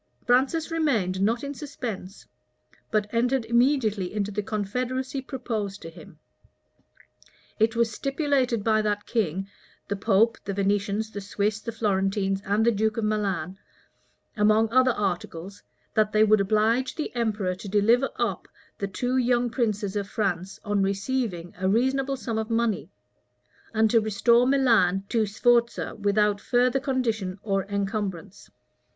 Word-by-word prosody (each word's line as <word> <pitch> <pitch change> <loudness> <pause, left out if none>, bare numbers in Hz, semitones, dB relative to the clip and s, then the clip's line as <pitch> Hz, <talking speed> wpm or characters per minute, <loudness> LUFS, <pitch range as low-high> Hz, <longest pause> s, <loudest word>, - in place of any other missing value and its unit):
Francis 270 +7 +2
remained 225 - 0
not 230 +5 +1
in 280 0 -4
suspense; 240 -10 -7 0.6
but 215 -1 +1
entered 245 +1 +1
immediately 235 -5 +2
into 210 -1 -2
the 210 +1 -2
confederacy 250 +6 -3
proposed 225 -7 -4
to 165 - -9
him. 170 0 -14 1.4
It 220 +1 +2
was 230 -1 +2
stipulated 275 -4 0
by 215 0 +3
that 205 -1 -1
king, 195 -4 -1 0.4
the 200 - -2
pope, 210 +3 +2
the 195 - -4
Venetians, 205 +2 0
the 205 - -6
Swiss, 205 +2 -1
the 230 - -5
Florentines, 195 -2 0
and 205 +3 +1
the 235 - +5
duke 220 0 0
of 225 - -1
Milan, 195 -4 -1 0.8
among 215 +1 +3
other 255 +1 +5
articles, 195 -3 -3 0.3
that 215 -1 +2
they 215 0 +5
would 215 -1 +4
oblige 220 +5 +1
the 310 - -4
emperor 215 -5 0
to 195 +2 -8
deliver 225 +6 +3
up 215 -7 -2 0.3
the 200 - -1
two 245 +6 -1
young 245 -1 +2
princes 210 -5 -1
of 200 -1 -2
France 195 -3 -2
on 205 -1 +1
receiving 195 -3 -2
a 190 0 +1
reasonable 265 +5 +1
sum 230 -3 -3
of 220 +1 -4
money; 225 -9 0 0.8
and 220 -1 +2
to 230 - +5
restore 235 +4 +3
Milan 230 -9 +3
to 225 -2 +1
Sforza, 235 +3 +1
without 205 0 +1
further 250 +3 +2
condition 225 -9 -1
or 195 -2 0
encumbrance. 200 -2 -4
215 Hz, 145 wpm, -26 LUFS, 200-240 Hz, 1.4 s, the